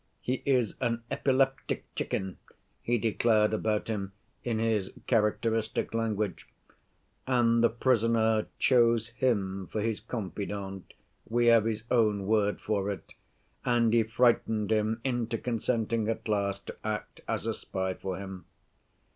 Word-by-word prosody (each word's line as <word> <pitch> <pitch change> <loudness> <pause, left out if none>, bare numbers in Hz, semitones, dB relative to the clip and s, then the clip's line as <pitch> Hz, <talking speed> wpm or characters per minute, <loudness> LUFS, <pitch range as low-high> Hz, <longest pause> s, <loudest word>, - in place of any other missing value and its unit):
'He 130 +1 -2
is 125 -6 +2
an 115 -2 -1
epileptic 135 0 +1
chicken,' 95 -1 -3 0.4
he 120 +1 +1
declared 110 -1 +2
about 110 -1 0
him 100 -3 -3 0.3
in 120 -2 -1
his 110 -4 0
characteristic 110 -1 +1
language. 110 -5 -1 0.8
And 120 -2 +3
the 115 - +6
prisoner 115 -2 +2
chose 115 -3 +3
him 100 -6 -1
for 110 - -2
his 110 0 -1
confidant 100 -3 -5 0.4
(we 120 +1 +2
have 115 -2 +5
his 110 -1 -2
own 105 -5 +3
word 105 0 +2
for 100 -2 -1
it) 100 - -6 0.5
and 120 -2 +3
he 115 - +5
frightened 110 -2 +2
him 110 +1 +1
into 120 -3 -1
consenting 115 -1 -1
at 115 - -3
last 100 -2 -1
to - - -7
act 110 -1 -4
as - - -2
a - - 0
spy 95 0 -3
for 95 0 -5
him. 95 -1 -8
110 Hz, 135 wpm, -29 LUFS, 105-115 Hz, 0.8 s, the